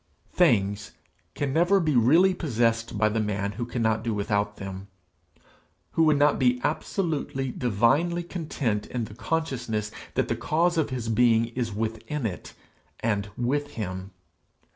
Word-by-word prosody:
Things 105 - +2 0.4
can 140 -2 -1
never 175 +5 +4
be 155 -5 +1
really 160 +11 +5
possessed 115 -9 0
by 110 +1 +3
the 110 +1 0
man 100 -1 -1
who 120 +3 -5
cannot 110 -3 0
do 115 -2 -1
without 100 0 -1
them 95 0 -7 1.0
who 165 - +3
would 155 -2 +4
not 145 +1 +3
be 125 -1 +3
absolutely, 150 -4 -1
divinely 125 - +1
content 145 - -2
in 120 -3 -3
the 105 - -11
consciousness 120 -4 -2 0.2
that - - +1
the - - 0
cause 170 +3 +1
of 160 -3 +1
his 125 -3 -4
being 115 0 +3
is 120 -1 -3
within 115 +6 -3
it 95 -5 -5 0.5
and 105 -3 0
with 145 +4 -1
him. 95 -3 -5
120 Hz, 145 wpm, -26 LUFS, 105-150 Hz, 1.0 s, really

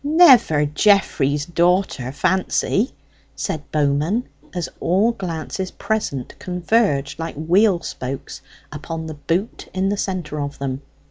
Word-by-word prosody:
"Never 275 - +6
Geoffrey's 150 -4 +2
daughter 175 -6 +1
Fancy?" 190 - +1 0.4
said 150 -2 -4
Bowman, 150 +9 +1 0.3
as 175 -2 -3
all 195 +7 +2
glances 185 -2 -4
present 200 -14 -3
converged 180 -6 0
like 165 0 -4
wheel 175 +5 +3
spokes 130 +2 -6 0.3
upon 160 +2 -5
the 160 - -5
boot 165 +9 -3
in 190 +1 +1
the 205 - -1
centre 175 -7 -3
of 145 0 -4
them. 135 -1 -3
170 Hz, 120 wpm, -21 LUFS, 145-195 Hz, 0.4 s, Never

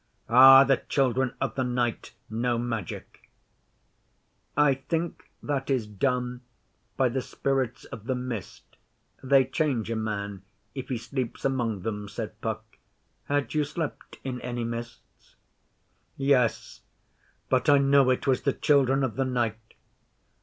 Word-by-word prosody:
Ah! 135 +3 +9
The 135 -1 +3
Children 130 -2 0
of - - -1
the 130 - -1
Night 120 -2 -2
know 120 +2 -1
magic.' 115 -6 -5 1.3
'I 145 -2 +5 0.2
think 165 0 -2
that 140 -2 -2
is 130 -5 +1
done 125 +3 -1 0.6
by 130 - +3
the 130 +2 -1
Spirits 130 -2 -2
of 110 -1 -10
the 130 0 -1
Mist. 125 -5 -6 0.6
They 135 0 +4
change 130 -5 -1
a - - -1
man, 100 -3 -3 0.3
if 130 -2 -6
he 130 - -1
sleeps 120 +1 -4
among 120 -8 -1
them,' 105 -2 -4
said - - -7
Puck. - - -3 0.6
'Had 145 -1 -1
you 155 -1 +2
slept 145 +1 -5
in 125 -2 -4
any 120 -1 -3
mists?' 115 0 -8 0.8
'Yes 135 -4 +1 0.7
but 130 +4 +2
I 145 - +7
know 140 -1 +4
it 130 - +1
was 135 -2 +2
the 140 - +1
Children 135 -2 +3
of 130 -3 -2
the 135 - +1
Night. 115 -3 -2
125 Hz, 140 wpm, -27 LUFS, 115-135 Hz, 1.3 s, Ah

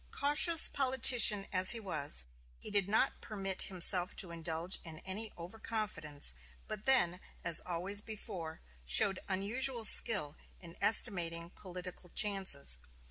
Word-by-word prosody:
Cautious 295 +3 +3
politician 245 -6 +2
as 185 0 +6
he 235 - +1
was, 150 - -2 0.3
he - - -9
did 200 -2 -2
not 225 +5 -2
permit 195 -3 -3
himself 180 0 +2
to 180 - -3
indulge 165 +2 -4
in 160 -2 -10
any 205 +3 -4
over 175 +6 -11
confidence, 160 - -4 0.3
but 215 0 -9
then, 180 -10 +4 0.2
as 170 -2 +3
always 185 +4 -3
before, 195 -7 -9 0.2
showed 185 - +3
unusual 230 +6 -1
skill 200 -10 +6 0.2
in 170 -2 -14
estimating 170 -6 +1
political 180 -1 -11
chances. 190 - 0
190 Hz, 130 wpm, -31 LUFS, 170-215 Hz, 0.3 s, as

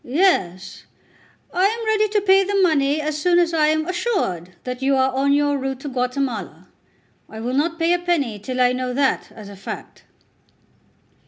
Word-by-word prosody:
"Yes; 200 - 0 0.7
I 365 +2 +2
am 450 +3 0
ready 430 -1 +2
to 415 0 +1
pay 390 0 +5
the 400 +1 -2
money 295 -3 +2
as 305 0 -3
soon 350 +1 +3
as 340 -1 +2
I 310 -2 +3
am 310 0 +1
assured 350 - -2
that 250 0 -5
you 270 +1 +2
are 265 0 +2
on 275 +2 +1
your 285 0 +2
route 265 0 -4
to 285 - -5
Guatemala. 250 - -3 0.6
I 220 - -9
will 240 +3 -3
not 325 +5 0
pay 335 +1 +2
a 355 - +1
penny 295 -12 -1
till 255 +5 -5
I 250 0 +4
know 255 0 -3
that 275 -1 0
as 210 -2 -10
a 200 - -10
fact." 195 - -9
280 Hz, 185 wpm, -21 LUFS, 250-345 Hz, 0.7 s, pay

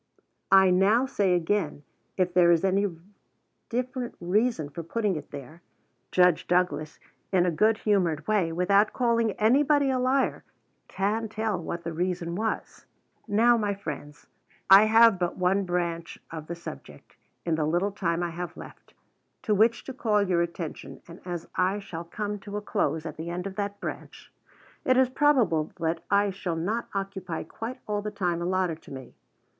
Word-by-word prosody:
I 190 -1 +7
now 200 +7 +4
say 200 -8 +1
again, 165 -4 -1 0.3
if 180 -2 +1
there 175 -1 +5
is 170 +2 +4
any 195 +2 +2 0.8
different 250 0 -3
reason 180 -2 0
for 160 +4 -6
putting 205 +3 -1
it 150 -2 -7
there, 145 +4 -10 0.5
Judge 180 -3 +3
Douglas, 175 -3 0 0.3
in 180 -2 +3
a 180 - +2
good 215 +6 +3
humored 180 -9 +1
way, 200 -6 +1
without 200 +5 +3
calling 230 -3 +1
anybody 275 +6 +3
a 260 - 0
liar, 260 +2 +1 0.4
can 215 +3 -1
tell 215 -3 -2
what 170 +1 -5
the 170 - -4
reason 175 0 -2
was. 220 +5 -4 0.4
Now, 230 +3 +4
my 205 -2 -1
friends, 150 -5 -8 0.5
I 195 +2 +10
have 225 -2 +6
but 175 -1 -1
one 190 +2 +1
branch 170 -2 -2
of 160 -2 -7
the 170 - -4
subject, 170 - -11 0.3
in 170 - 0
the 155 -1 +1
little 175 +6 +1
time 175 -4 -1
I 170 - -2
have 175 +1 -6
left, - - -13 0.5
to 215 - +1
which 225 +3 +3
to 265 - -7
call 215 -5 +1
your 180 -3 +1
attention; 165 -6 -6
and, 170 +1 -12
as 175 -2 -5
I 185 +2 +2
shall 170 -4 -7
come 205 +4 -4
to 205 +1 -6
a - - -3
close 165 -7 -1
at 155 -2 -6
the 160 +2 -5
end 180 +2 -4
of 195 -1 -5
that 205 0 -3
branch, - - -8 0.5
it 255 0 +3
is 260 -1 +4
probable 255 - +2
that 165 0 -1
I 200 0 +3
shall 185 -3 -4
not 205 +9 -2
occupy 195 -3 -4
quite 225 +9 -7
all 210 -1 -1
the 210 - -4
time 180 -5 -2
allotted 180 -2 -1
to - - -15
me. 130 -2 -9
190 Hz, 170 wpm, -27 LUFS, 170-215 Hz, 0.8 s, I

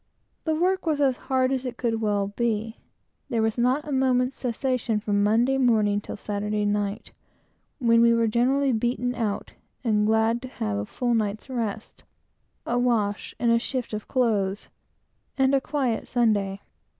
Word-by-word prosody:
The 315 -1 +1
work 365 +2 0
was 305 -2 +1
as 270 -3 +3
hard 260 -1 +2
as 265 -1 -1
it 245 -2 -5
could 225 -2 -1
well 205 -2 0
be. 225 -1 -1 0.5
There 230 -4 +1
was 220 -1 0
not 255 +5 +1
a - - -4
moment's 260 -1 +2
cessation 245 -2 -1
from 205 -1 0
Monday 235 +6 +3
morning 215 -5 +3
till - - -7
Saturday 210 +1 -2
night, 205 0 -2 0.7
when 230 -3 +4
we 235 0 +6
were 230 0 +3
generally 260 +5 +2
beaten 245 +2 0
out, 215 -4 -3 0.3
and 210 -3 +2
glad 220 +2 +2
to 255 - -7
have 105 - -3
a 100 - -3
full 245 -1 -1
night's 215 +3 -2
rest, 225 -3 -4 0.6
a 240 +1 0
wash 220 -4 0
and 230 -1 +2
shift 255 -4 -3
of 215 0 -4
clothes, 210 -6 0 0.7
and 265 0 +3
a 275 - +3
quiet 265 -5 -1
Sunday. 205 -5 +1
235 Hz, 160 wpm, -25 LUFS, 210-255 Hz, 0.7 s, we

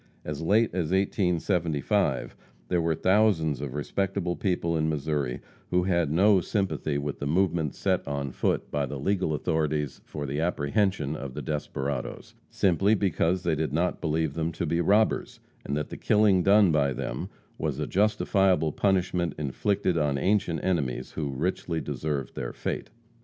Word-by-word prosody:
As 75 0 -4
late 105 +7 +3
as 85 -4 -1
1875, 90 -5 0 0.3
there 90 -2 +2
were 80 -1 +1
thousands 90 - +2
of 70 -2 -5
respectable 95 +3 -1
people 90 -4 0
in 80 0 +1
Missouri 75 -4 -2 0.3
who 90 0 +2
had 85 -4 +1
no 95 +4 +5
sympathy 95 -6 -1
with 70 0 -4
the 70 - -3
movements 85 -2 +1
set - - 0
on 70 -2 -3
foot - - -1
by 70 -1 0
the 70 - -5
legal 90 +4 0
authorities 75 -1 -1
for 75 -1 -6
the 70 +2 -3
apprehension 85 -1 0
of 70 -4 -7
the - - -5
desperadoes, 70 -3 -4 0.2
simply 100 +3 +3
because 95 -2 +1
they 85 -2 +1
did 75 -2 -1
not 85 +3 0
believe 80 -2 0
them 80 +1 -1
to - - -2
be 85 +1 +1
robbers, 105 +5 +2 0.2
and 70 - -2
that 75 - -3
the - - -7
killing 105 -3 +4
done 100 0 +5
by 70 -3 +2
them 65 +1 -4 0.3
was 75 -4 -1
a 75 - -1
justifiable 95 -5 +2
punishment 90 -2 0
inflicted 90 +5 0
on 75 -2 +1
ancient 95 +1 +1
enemies 70 -9 -1
who 75 -3 -3
richly 80 +3 -2
deserved 75 -2 -3
their - - -5
fate. - - -4
80 Hz, 160 wpm, -27 LUFS, 75-95 Hz, 0.3 s, no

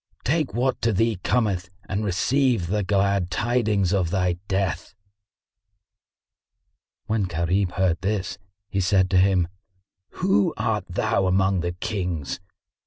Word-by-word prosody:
Take 150 -5 0
what 125 +1 0
to 115 - +2
thee 115 +1 +1
cometh 100 -7 0 0.2
and 100 +3 -2
receive 120 +2 +1
the 105 +5 0
glad 100 -1 +1
tidings 105 -5 +1
of 95 -4 +1
thy 90 -1 0
death." 95 0 -2 2.1
When 110 -1 0
Gharib 90 +2 0
heard 90 -3 +1
this, 100 0 -2 0.3
he 100 - -2
said 95 0 +2
to 95 - +5
him, 95 -2 +3 0.7
"Who 185 -1 +2
art 105 -4 -1
thou 95 +2 +1
among 95 0 +2
the 85 0 -2
Kings?" 90 -7 -3
95 Hz, 125 wpm, -24 LUFS, 90-110 Hz, 2.1 s, to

